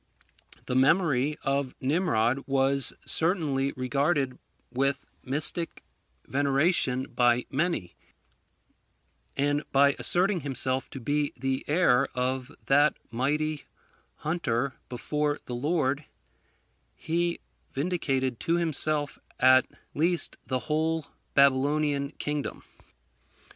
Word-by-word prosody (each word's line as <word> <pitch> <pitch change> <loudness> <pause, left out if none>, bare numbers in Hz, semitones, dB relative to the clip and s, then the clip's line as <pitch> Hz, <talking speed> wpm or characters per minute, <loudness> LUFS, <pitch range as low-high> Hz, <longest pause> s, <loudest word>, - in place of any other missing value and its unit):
The - - -3
memory 145 0 +2
of 135 -1 -1
Nimrod 130 -4 0
was 135 0 +4
certainly 155 -6 +4
regarded 135 +1 -1 0.3
with 135 +2 -1 0.2
mystic 150 +5 +2 0.4
veneration 140 -1 +1
by 120 -1 +1
many; 145 - -1 1.4
and 145 +1 +1
by 140 +1 +4
asserting 185 +1 +1
himself 130 -2 -2
to 135 - -8
be 145 +3 -1
the 135 +1 -2
heir 140 -5 +3
of 130 +1 -2
that 145 +2 +3
mighty 150 +5 -1 0.5
hunter 140 -5 -2 0.2
before 150 +4 -2
the 125 - -6
Lord, 145 +1 -1 0.9
he 170 +1 -2 0.3
vindicated 135 -6 -1
to 165 - 0
himself 155 -3 -1 0.2
at 130 0 +5 0.3
least 170 +1 +1
the 130 -1 -1
whole 160 0 -1 0.3
Babylonian 140 +1 +2
kingdom. 150 -1 -4
140 Hz, 95 wpm, -27 LUFS, 130-155 Hz, 1.4 s, at